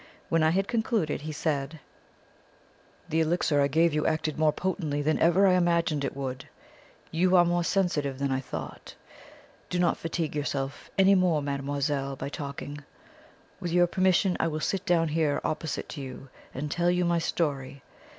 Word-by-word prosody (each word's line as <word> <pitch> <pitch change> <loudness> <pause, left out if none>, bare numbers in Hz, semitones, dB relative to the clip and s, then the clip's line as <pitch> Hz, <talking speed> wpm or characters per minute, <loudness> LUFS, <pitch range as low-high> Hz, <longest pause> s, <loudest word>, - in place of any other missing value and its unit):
When 165 - +2
I 155 - +4
had 195 +4 +1
concluded 220 - 0
he 155 +1 -5
said: 150 0 -2 1.3
"The 160 +1 +1
elixir 160 -2 +2
I 140 - +4
gave 160 +3 +3
you 150 0 +1
acted 155 -1 -1
more 155 -1 +4
potently 155 -5 -2
than 155 +2 +1
even 175 +4 +5
I 190 - +5
imagined 170 -4 +2
it 135 - -3
would. 130 -2 -5 0.6
You 180 +3 +3
are 175 -1 +6
more 175 0 +1
sensitive 160 -8 0
than 140 0 -1
I 130 - +1
thought. 130 - -7 0.7
Do 180 - -1
not 175 -1 +2
fatigue 165 -2 -3
yourself 140 -1 -3
any 195 0 +6
more, 180 -6 +2
mademoiselle, 140 0 -2
by 135 +1 -5
talking. 145 0 -6 0.8
With 175 - -4
your 175 +1 +5
permission 185 +1 +2
I - - +2
will 155 -1 -2
sit 190 +4 -2
down 165 -2 +3
here 155 -2 +1
opposite 155 -1 -3
to 145 - -6
you 135 0 -8 0.2
and 145 +3 -5
tell 175 +2 +1
you 180 0 +2
my 170 0 +2
story. 140 -5 -2
155 Hz, 170 wpm, -27 LUFS, 145-175 Hz, 1.3 s, are